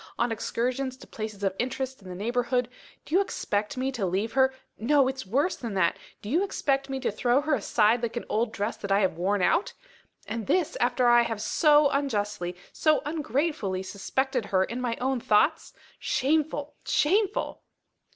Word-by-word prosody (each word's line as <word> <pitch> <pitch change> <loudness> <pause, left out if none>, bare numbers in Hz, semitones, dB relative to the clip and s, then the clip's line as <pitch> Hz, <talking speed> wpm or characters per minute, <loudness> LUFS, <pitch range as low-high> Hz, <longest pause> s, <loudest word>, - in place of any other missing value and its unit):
on 240 0 +1
excursions 255 +4 -2
to - - -13
places 215 -2 -7
of 190 -1 0
interest 260 0 -3
in 190 - -11
the 180 - -6
neighbourhood, 245 +4 0 0.4
do - - -9
you 375 - +5
expect 210 - -2
me 260 +1 -1
to 240 -6 -4
leave 195 +5 -1
her 265 0 +4 0.3
no! 275 +3 +3
it's 265 -5 -4
worse 280 - +1
than 230 -5 -6
that 170 -3 +2 0.3
do - - -7
you 340 +7 +3
expect 275 -8 -1
me 270 0 -2
to 255 - -1
throw 245 +5 +2
her 300 +1 0
aside 225 -1 +2
like 235 0 -3
an - - -4
old 225 +1 0
dress 205 +1 -2
that 200 - -5
I 200 +1 +4
have 190 -4 +1
worn 195 +1 +1
out? 340 - +2 0.5
And 220 -2 -4
this 360 -4 +1
after 245 +1 +1
I 240 0 +7
have 225 -2 -2
so 295 +6 +4
unjustly, 210 -10 -1 0.2
so 310 -1 +2
ungratefully 290 - -1
suspected 250 +5 -2
her 190 -2 +2
in 235 +6 -4
my 240 -2 -1
own 260 0 0
thoughts? 230 +9 +2 0.3
Shameful! 295 +1 0
shameful!" 400 +6 +1
245 Hz, 180 wpm, -27 LUFS, 210-275 Hz, 0.5 s, I